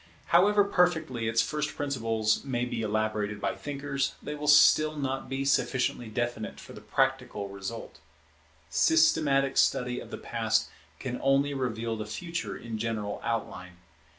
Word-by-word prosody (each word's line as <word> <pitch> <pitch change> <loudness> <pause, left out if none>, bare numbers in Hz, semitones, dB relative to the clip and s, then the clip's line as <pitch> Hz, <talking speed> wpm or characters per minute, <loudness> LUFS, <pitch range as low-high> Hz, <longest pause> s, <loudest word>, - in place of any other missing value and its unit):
However 205 +4 +6
perfectly 160 - +1
its 115 +1 +3
first 150 -1 -3
principles 115 -6 0
may 125 -3 -1
be 120 -2 -3
elaborated 110 -1 -1
by - - -1
thinkers, 140 -1 -3
they 150 - -6
will 150 0 -5
still 155 +1 +6
be - - -6 0.4
not - - -2
sufficiently 130 -3 +1
definite 120 0 -3
for - - -11
the 105 - -11
practical 125 -2 -1
result. 100 +1 -7 0.7
Systematic 150 - +3
study 125 0 +2
of - - -10
the - - -6
Past - - 0 0.3
can 125 -1 -5
only 135 +1 +2
reveal 115 -4 -2
the 110 0 -5
Future 170 +9 -4
in 115 -2 -6
general 110 -2 -3
outline. 105 -6 -3
125 Hz, 145 wpm, -28 LUFS, 110-145 Hz, 0.7 s, However